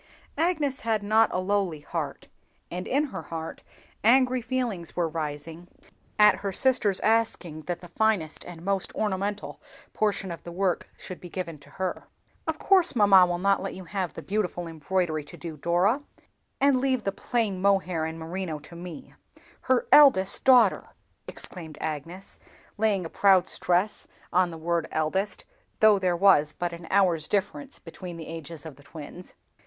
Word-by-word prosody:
Agnes 310 Hz, -5 st, +1 dB
had 220 Hz, -2 st, -1 dB
not 220 Hz, +2 st, +4 dB
a -, -, -1 dB
lowly 185 Hz, -5 st, -1 dB
heart, -, -, -5 dB, 0.4 s
and 180 Hz, +1 st, -5 dB
in 280 Hz, +3 st, +2 dB
her -, -, -4 dB
heart 165 Hz, -1 st, -7 dB, 0.4 s
angry 255 Hz, +2 st, +4 dB
feelings 235 Hz, -8 st, -3 dB
were 175 Hz, -2 st, +1 dB
rising 160 Hz, +2 st, -5 dB, 0.5 s
at 210 Hz, 0 st, +6 dB
her 200 Hz, -1 st, -3 dB
sister's 220 Hz, -4 st, +1 dB
asking 215 Hz, -8 st, 0 dB
that 175 Hz, -1 st, -3 dB
the 175 Hz, -, -10 dB
finest 180 Hz, -4 st, 0 dB
and 175 Hz, -1 st, -10 dB
most 195 Hz, -1 st, -1 dB
ornamental 205 Hz, 0 st, -2 dB, 0.3 s
portion 205 Hz, -3 st, 0 dB
of 170 Hz, -, -7 dB
the 170 Hz, -, -8 dB
work 180 Hz, 0 st, -1 dB
should 185 Hz, -, -9 dB
be 175 Hz, -, -9 dB
given 165 Hz, -4 st, -5 dB
to 145 Hz, -, -18 dB
her. 185 Hz, -1 st, -4 dB, 0.4 s
"Of 320 Hz, -1 st, -1 dB
course 370 Hz, -5 st, +3 dB
mamma 195 Hz, -4 st, +7 dB
will 175 Hz, 0 st, -1 dB
not 195 Hz, +2 st, +2 dB
let 195 Hz, -, -5 dB
you 190 Hz, -, -8 dB
have 185 Hz, 0 st, -4 dB
the -, -, -7 dB
beautiful 190 Hz, -4 st, -2 dB
embroidery 165 Hz, 0 st, -1 dB
to -, -, -12 dB
do, 165 Hz, -2 st, -7 dB
Dora, 175 Hz, -, +1 dB, 0.6 s
and 275 Hz, -2 st, +4 dB
leave 260 Hz, -2 st, +1 dB
the 195 Hz, -, 0 dB
plain 205 Hz, -2 st, -2 dB
mohair 190 Hz, -4 st, +2 dB
and 160 Hz, +1 st, -4 dB
merino 165 Hz, 0 st, -4 dB
to 150 Hz, +3 st, -13 dB
me, 180 Hz, +9 st, -9 dB, 0.5 s
her 255 Hz, -1 st, +1 dB
eldest 250 Hz, -10 st, +6 dB
daughter!" 245 Hz, -6 st, +5 dB, 0.4 s
exclaimed 160 Hz, -4 st, -8 dB
Agnes, 165 Hz, +5 st, -6 dB, 0.4 s
laying 205 Hz, -4 st, +1 dB
a -, -, -3 dB
proud 190 Hz, +1 st, +4 dB
stress 180 Hz, +4 st, 0 dB, 0.3 s
on 180 Hz, 0 st, +3 dB
the 165 Hz, -, -8 dB
word 170 Hz, 0 st, -1 dB
eldest, 190 Hz, +6 st, -1 dB, 0.3 s
though, 215 Hz, -2 st, +6 dB
there 180 Hz, -2 st, +1 dB
was 155 Hz, -6 st, +5 dB
but 175 Hz, -1 st, -3 dB
an 170 Hz, 0 st, -9 dB
hour's 180 Hz, -6 st, +2 dB
difference 210 Hz, +8 st, -2 dB
between 180 Hz, -3 st, -9 dB
the 160 Hz, -, -8 dB
ages 165 Hz, -1 st, -8 dB
of 150 Hz, -5 st, -9 dB
the 145 Hz, -, -17 dB
twins. 160 Hz, +4 st, -11 dB
185 Hz, 165 wpm, -26 LUFS, 170-210 Hz, 0.6 s, mamma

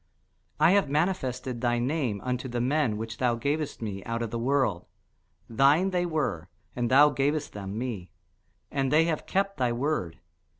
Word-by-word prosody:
I 155 Hz, +3 st, +6 dB
have 200 Hz, -6 st, +3 dB
manifested 135 Hz, -6 st, -1 dB
thy 120 Hz, -1 st, +1 dB
name 125 Hz, -4 st, -1 dB
unto 125 Hz, 0 st, -2 dB
the 120 Hz, 0 st, -2 dB
men 125 Hz, -3 st, +1 dB
which 115 Hz, +1 st, -6 dB
thou 125 Hz, -2 st, +2 dB
gavest 140 Hz, +2 st, -2 dB
me 100 Hz, -3 st, -5 dB
out 115 Hz, 0 st, -3 dB
of 115 Hz, -, -4 dB
the 115 Hz, -, -3 dB
world: 125 Hz, -7 st, 0 dB, 0.6 s
thine 145 Hz, +11 st, +3 dB
they 180 Hz, -1 st, 0 dB
were, 140 Hz, -, -2 dB, 0.3 s
and 120 Hz, -1 st, -1 dB
thou 145 Hz, +3 st, +6 dB
gavest 145 Hz, +2 st, -1 dB
them 100 Hz, 0 st, -6 dB
me; 110 Hz, -8 st, -4 dB, 0.6 s
and 135 Hz, -2 st, 0 dB
they 155 Hz, +2 st, +5 dB
have 165 Hz, -2 st, -2 dB
kept 195 Hz, +1 st, 0 dB
thy 125 Hz, -2 st, +1 dB
word. 120 Hz, -, -2 dB
130 Hz, 170 wpm, -27 LUFS, 115-150 Hz, 0.6 s, I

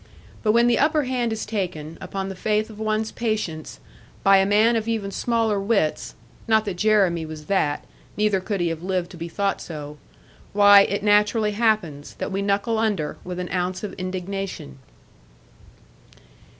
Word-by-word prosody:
But 215 Hz, -1 st, +2 dB
when 235 Hz, +1 st, +5 dB
the 240 Hz, -1 st, +3 dB
upper 305 Hz, +1 st, +3 dB
hand 250 Hz, -3 st, -1 dB
is 220 Hz, -, -3 dB
taken, 180 Hz, -7 st, -4 dB
upon 195 Hz, -1 st, -4 dB
the 195 Hz, -, -6 dB
faith 215 Hz, +3 st, -1 dB
of 215 Hz, -, -12 dB
one's 215 Hz, 0 st, -1 dB
patience, 215 Hz, -9 st, -3 dB, 0.4 s
by 195 Hz, 0 st, +6 dB
a 195 Hz, 0 st, +3 dB
man 215 Hz, +3 st, +4 dB
of 225 Hz, -1 st, -1 dB
even 215 Hz, -4 st, -2 dB
smaller 225 Hz, -1 st, 0 dB
wits 195 Hz, -6 st, 0 dB, 0.3 s
(not 220 Hz, -1 st, +3 dB
that 200 Hz, -, -2 dB
Jeremy 195 Hz, -5 st, +3 dB
was 155 Hz, -1 st, -8 dB
that, 150 Hz, -5 st, 0 dB, 0.3 s
neither 210 Hz, -2 st, +2 dB
could 195 Hz, 0 st, -3 dB
he 170 Hz, -, +1 dB
have 165 Hz, -1 st, -4 dB
lived 185 Hz, -1 st, -2 dB
to 180 Hz, -, -11 dB
be 170 Hz, +1 st, -6 dB
thought 200 Hz, +3 st, -1 dB
so), 150 Hz, -2 st, -8 dB, 0.5 s
why, 205 Hz, 0 st, +8 dB
it 200 Hz, +1 st, -2 dB
naturally 210 Hz, +1 st, +3 dB
happens, 205 Hz, -10 st, -1 dB
that -, -, -4 dB
we 195 Hz, +1 st, -1 dB
knuckle 200 Hz, +3 st, 0 dB
under, 205 Hz, -9 st, -1 dB
with 180 Hz, 0 st, -6 dB
an 180 Hz, 0 st, -5 dB
ounce 180 Hz, +1 st, -2 dB
of 210 Hz, -, -4 dB
indignation. 185 Hz, -, -5 dB
200 Hz, 170 wpm, -23 LUFS, 180-220 Hz, 0.5 s, why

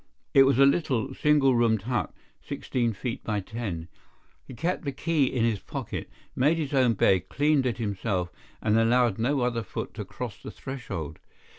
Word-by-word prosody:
It 135 Hz, -1 st, +8 dB
was 135 Hz, -, +3 dB
a 135 Hz, -, +7 dB
little, 135 Hz, -4 st, +1 dB
single 145 Hz, -3 st, +3 dB
roomed 115 Hz, -4 st, +2 dB
hut, 120 Hz, +2 st, -1 dB, 0.3 s
sixteen 120 Hz, -3 st, -2 dB
feet 115 Hz, +4 st, -5 dB
by 105 Hz, -2 st, -1 dB
ten. 95 Hz, -5 st, -5 dB, 0.6 s
He 130 Hz, -, -9 dB
kept 175 Hz, +7 st, -1 dB
the 140 Hz, -, -2 dB
key 150 Hz, +1 st, +1 dB
in 125 Hz, -2 st, 0 dB
his 110 Hz, -4 st, 0 dB
pocket, -, -, -6 dB, 0.3 s
made 150 Hz, +6 st, +3 dB
his 150 Hz, -3 st, -3 dB
own 130 Hz, -4 st, +4 dB
bed, 95 Hz, -4 st, +2 dB
cleaned 145 Hz, -2 st, +2 dB
it 120 Hz, -, -2 dB
himself, 100 Hz, -4 st, -2 dB, 0.3 s
and 110 Hz, +1 st, +3 dB
allowed 115 Hz, -2 st, +3 dB
no 130 Hz, +4 st, +1 dB
other 120 Hz, -1 st, 0 dB
foot 105 Hz, -, -6 dB
to -, -, -5 dB
cross -, -, -7 dB
the -, -, -7 dB
threshold. 95 Hz, -, -6 dB
120 Hz, 175 wpm, -27 LUFS, 110-135 Hz, 0.6 s, It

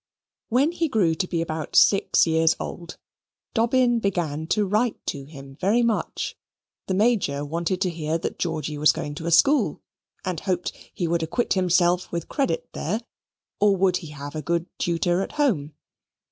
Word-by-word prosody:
When 265 Hz, +7 st, +3 dB
he 340 Hz, -1 st, 0 dB
grew 195 Hz, -10 st, +2 dB
to 180 Hz, +3 st, -2 dB
be 170 Hz, -2 st, -1 dB
about 155 Hz, -1 st, -5 dB
six 195 Hz, -, +5 dB
years 160 Hz, 0 st, +3 dB
old, 170 Hz, -1 st, -7 dB, 0.6 s
Dobbin 240 Hz, +1 st, +3 dB
began 165 Hz, -7 st, -2 dB
to 210 Hz, +4 st, +1 dB
write 215 Hz, +3 st, +1 dB
to 140 Hz, -1 st, -4 dB
him 135 Hz, -2 st, -12 dB
very 215 Hz, +6 st, +3 dB
much. 230 Hz, -2 st, -1 dB, 0.5 s
The 190 Hz, -, 0 dB
Major 195 Hz, -10 st, +1 dB
wanted 170 Hz, +4 st, -2 dB
to 185 Hz, -3 st, +1 dB
hear 160 Hz, -1 st, -2 dB
that 165 Hz, -, -5 dB
Georgy 155 Hz, -3 st, -2 dB
was 150 Hz, -, +6 dB
going 145 Hz, -, -4 dB
to 160 Hz, +3 st, -6 dB
a -, -, 0 dB
school 280 Hz, -, +3 dB, 0.4 s
and 180 Hz, -3 st, -2 dB
hoped 180 Hz, -3 st, -1 dB, 0.2 s
he 175 Hz, -, -2 dB
would 170 Hz, 0 st, 0 dB
acquit 165 Hz, +9 st, 0 dB
himself 180 Hz, -1 st, +2 dB
with 170 Hz, -1 st, -4 dB
credit 270 Hz, -, -1 dB
there: 210 Hz, +9 st, -2 dB, 0.6 s
or 205 Hz, -1 st, +4 dB
would 185 Hz, -1 st, +3 dB
he 165 Hz, -, -9 dB
have 145 Hz, -1 st, -8 dB
a 155 Hz, -, -4 dB
good 170 Hz, +1 st, -1 dB
tutor 175 Hz, +1 st, +1 dB
at -, -, -5 dB
home? 185 Hz, -, 0 dB
175 Hz, 175 wpm, -24 LUFS, 160-210 Hz, 0.6 s, was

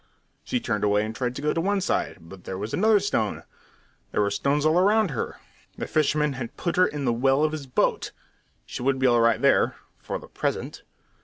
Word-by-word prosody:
She 250 Hz, -, -1 dB
turned 105 Hz, -, -2 dB
away 105 Hz, 0 st, +2 dB
and 110 Hz, +1 st, -6 dB
tried 125 Hz, 0 st, -2 dB
to 140 Hz, -, -6 dB
go 150 Hz, -, +1 dB
to 165 Hz, -, 0 dB
one 200 Hz, +3 st, +1 dB
side, 190 Hz, -, -1 dB
but 90 Hz, +2 st, -13 dB
there 95 Hz, -, -5 dB
was 105 Hz, +3 st, -5 dB
another 215 Hz, +1 st, +4 dB
stone; 190 Hz, -, -1 dB, 0.7 s
there -, -, +1 dB
were 100 Hz, -1 st, +1 dB
stones 140 Hz, +8 st, 0 dB
all 160 Hz, +3 st, +4 dB
round 210 Hz, -1 st, +3 dB
her. 120 Hz, -, -4 dB, 0.4 s
The -, -, -3 dB
fisherman 150 Hz, -1 st, +1 dB
had 125 Hz, -3 st, -7 dB
put 170 Hz, -, -2 dB
her 185 Hz, 0 st, +5 dB
into 145 Hz, -2 st, -4 dB
the 120 Hz, -, +2 dB
well 135 Hz, +4 st, +2 dB
of 155 Hz, -, +2 dB
his 150 Hz, -3 st, -6 dB
boat. 125 Hz, -, 0 dB, 0.5 s
She -, -, -7 dB
would 135 Hz, +1 st, +1 dB
be 130 Hz, -, 0 dB
all 120 Hz, -2 st, +4 dB
right 115 Hz, -1 st, +3 dB
there -, -, +3 dB, 0.2 s
for -, -, -4 dB
the -, -, -12 dB
present! -, -, -3 dB
135 Hz, 220 wpm, -25 LUFS, 115-165 Hz, 0.7 s, her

